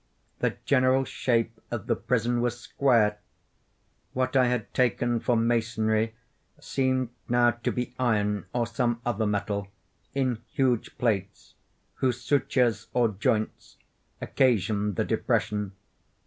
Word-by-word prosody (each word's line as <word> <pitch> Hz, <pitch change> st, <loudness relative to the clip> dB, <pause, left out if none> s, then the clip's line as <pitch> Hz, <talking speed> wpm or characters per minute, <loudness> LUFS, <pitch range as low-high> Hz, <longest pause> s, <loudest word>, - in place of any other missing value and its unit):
The -, -, 0 dB
general 130 Hz, 0 st, +3 dB
shape 115 Hz, -3 st, 0 dB
of 115 Hz, -4 st, -4 dB
the 115 Hz, -, +1 dB
prison 120 Hz, 0 st, 0 dB
was 120 Hz, 0 st, -1 dB
square. 115 Hz, -5 st, +2 dB, 0.9 s
What 130 Hz, +1 st, -1 dB
I 130 Hz, -2 st, +5 dB
had 120 Hz, -3 st, -2 dB
taken 120 Hz, -1 st, +1 dB
for 120 Hz, +1 st, +1 dB
masonry 115 Hz, -1 st, +1 dB, 0.4 s
seemed 130 Hz, -2 st, 0 dB, 0.2 s
now 120 Hz, 0 st, +4 dB
to 120 Hz, +1 st, -3 dB
be 125 Hz, 0 st, -3 dB
iron, 105 Hz, -4 st, +1 dB
or 120 Hz, -1 st, 0 dB
some 120 Hz, 0 st, -1 dB
other 110 Hz, -2 st, 0 dB
metal, 100 Hz, -1 st, -1 dB, 0.5 s
in 130 Hz, -4 st, 0 dB
huge 125 Hz, -4 st, 0 dB
plates, 100 Hz, -5 st, -2 dB, 0.4 s
whose 125 Hz, -2 st, 0 dB
sutures 125 Hz, -6 st, +1 dB
or 120 Hz, -2 st, +4 dB
joints 105 Hz, +2 st, -2 dB, 0.4 s
occasioned 105 Hz, -5 st, +1 dB
the -, -, 0 dB
depression. 105 Hz, -2 st, 0 dB
120 Hz, 120 wpm, -27 LUFS, 110-125 Hz, 0.9 s, I